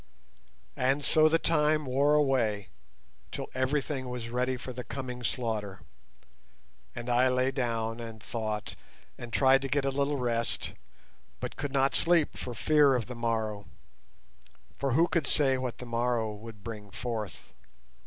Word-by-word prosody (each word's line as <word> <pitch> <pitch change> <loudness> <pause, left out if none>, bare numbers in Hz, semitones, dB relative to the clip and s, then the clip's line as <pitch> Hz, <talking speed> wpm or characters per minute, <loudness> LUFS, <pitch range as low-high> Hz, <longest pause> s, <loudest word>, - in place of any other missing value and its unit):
And 135 +3 +1
so 155 0 +5
the 165 - +4
time 155 -2 +2
wore 140 +3 +3
away, 120 -9 +2 0.6
till - - -5
everything 130 0 -1
was 120 -2 -5
ready 125 +2 0
for 125 +1 -7
the 125 0 -5
coming 125 0 -6
slaughter; 110 -6 -2 1.1
and 120 0 -6
I 125 +1 +4
lay 130 +1 +2
down 115 -3 -1
and 115 -1 -7
thought, 110 -2 -3 0.4
and 120 -1 -8
tried 135 +2 +5
to 135 - -2
get 140 +1 +1
a 135 - +1
little 140 +1 0
rest, 115 -2 -1 0.7
but - - -5
could 145 -1 -3
not 135 0 +2
sleep 170 -3 +3
for 125 -2 -6
fear 145 +1 +4
of 120 -3 -1
the 125 - -7
morrow—for 110 +3 -5
who 165 +6 +5
could 165 -6 0
say 135 -4 +3
what 125 -2 -3
the 125 - -8
morrow 115 -2 0
would 105 0 -11
bring 105 -2 -7
forth? 110 -1 -5
125 Hz, 150 wpm, -29 LUFS, 115-135 Hz, 1.1 s, so